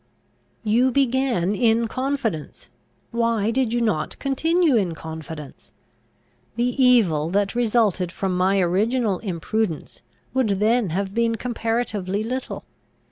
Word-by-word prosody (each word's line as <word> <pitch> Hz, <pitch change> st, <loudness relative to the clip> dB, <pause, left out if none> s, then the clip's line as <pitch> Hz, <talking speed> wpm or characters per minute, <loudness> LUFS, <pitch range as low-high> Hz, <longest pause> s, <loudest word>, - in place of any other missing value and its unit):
"You 235 Hz, +4 st, +3 dB
began 255 Hz, -7 st, +1 dB
in 230 Hz, +1 st, +2 dB
confidence; 255 Hz, -, -3 dB, 0.4 s
why 230 Hz, -2 st, +1 dB
did 250 Hz, -1 st, 0 dB
you 240 Hz, 0 st, 0 dB
not 185 Hz, -10 st, -1 dB
continue 320 Hz, +3 st, +2 dB
in 185 Hz, -7 st, +1 dB
confidence? 160 Hz, -3 st, -9 dB, 0.8 s
The 245 Hz, +1 st, 0 dB
evil 185 Hz, -12 st, +4 dB
that 200 Hz, +2 st, 0 dB
resulted 220 Hz, -7 st, +1 dB
from 190 Hz, 0 st, -2 dB
my 190 Hz, +2 st, +2 dB
original 205 Hz, +3 st, +1 dB
imprudence 190 Hz, -1 st, -3 dB, 0.3 s
would 220 Hz, -7 st, +1 dB
then 220 Hz, -1 st, +2 dB
have 190 Hz, +4 st, -2 dB
been 230 Hz, 0 st, +1 dB
comparatively 225 Hz, -4 st, -2 dB
little. 255 Hz, +3 st, -4 dB
220 Hz, 115 wpm, -23 LUFS, 190-245 Hz, 0.8 s, evil